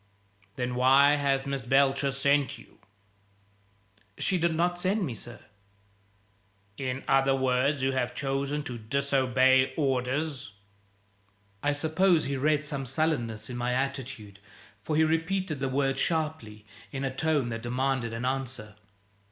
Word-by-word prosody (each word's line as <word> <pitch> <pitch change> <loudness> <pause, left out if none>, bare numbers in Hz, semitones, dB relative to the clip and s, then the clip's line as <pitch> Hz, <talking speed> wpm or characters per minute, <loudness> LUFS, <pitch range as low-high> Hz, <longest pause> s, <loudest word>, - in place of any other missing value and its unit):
"Then 125 0 -2
why 135 +3 +5
has 140 -1 +1
Miss 140 -1 -2
Belcher 135 +2 +2
sent 140 0 +1
you?" - - -18 1.4
"She 185 - 0
did 170 -1 +1
not 175 +2 0
send 190 +2 +1
me, 130 - -4
sir." 120 +2 -9 1.4
"In 130 +1 -4
other 135 0 +3
words, 130 +2 +1
you 135 - +2
have 125 -2 -2
chosen 140 +2 -2
to 120 -3 -6
disobey 130 +1 +2
orders?" 135 -2 -1 1.1
I 145 - +1
suppose 160 +3 +2
he 140 +1 -2
read 150 +2 +1
some 140 -3 -4
sullenness 120 -7 -1
in 125 - -6
my 120 +1 -1
attitude, 130 -6 -4 0.4
for 150 +9 -2
he 160 - +4
repeated 165 0 0
the 135 -1 -1
words 135 0 0
sharply, 150 -11 -2 0.3
in 140 -1 -4
a 135 -1 -3
tone 150 -5 +1
that 115 -1 -4
demanded 125 0 -1
an 115 +2 -4
answer. 130 -5 -3
135 Hz, 135 wpm, -28 LUFS, 125-150 Hz, 1.4 s, why